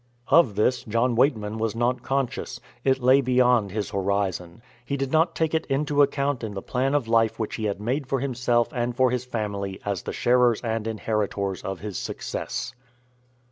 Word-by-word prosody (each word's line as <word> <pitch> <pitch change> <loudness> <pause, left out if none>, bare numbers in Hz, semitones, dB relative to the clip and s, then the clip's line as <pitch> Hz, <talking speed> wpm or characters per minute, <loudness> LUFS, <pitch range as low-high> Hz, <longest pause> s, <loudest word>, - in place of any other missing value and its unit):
Of 135 -12 +5
this 125 +5 +1
John 115 +3 +1
Weightman 110 -4 +1
was 115 0 -1
not 120 +1 0
conscious. 135 0 -2 0.2
It 130 -1 +1
lay 130 +2 +6
beyond 125 -4 +3
his 105 +1 -3
horizon. 100 -1 -2 0.2
He 140 +3 -3
did 135 -1 -2
not 160 +2 +2
take 160 -1 0
it 160 0 0
into 145 +1 +1
account 140 -2 +1
in 105 -2 -4
the 95 - -4
plan 130 +3 0
of 135 -6 0
life 115 -1 +2
which 110 -2 -3
he 110 -2 -1
made 125 +7 -2
for 135 0 0
himself 120 -3 +1
and 120 -1 -2
for 130 -1 +3
his 125 0 -2
family 100 -5 -4
as 100 -3 -2
the - - -5
sharers 120 -2 +3
and 115 -2 -2
inheritors 105 -3 -2
of 95 -1 -5
his 105 -3 -4
success. - - -4
120 Hz, 180 wpm, -25 LUFS, 105-130 Hz, 0.2 s, lay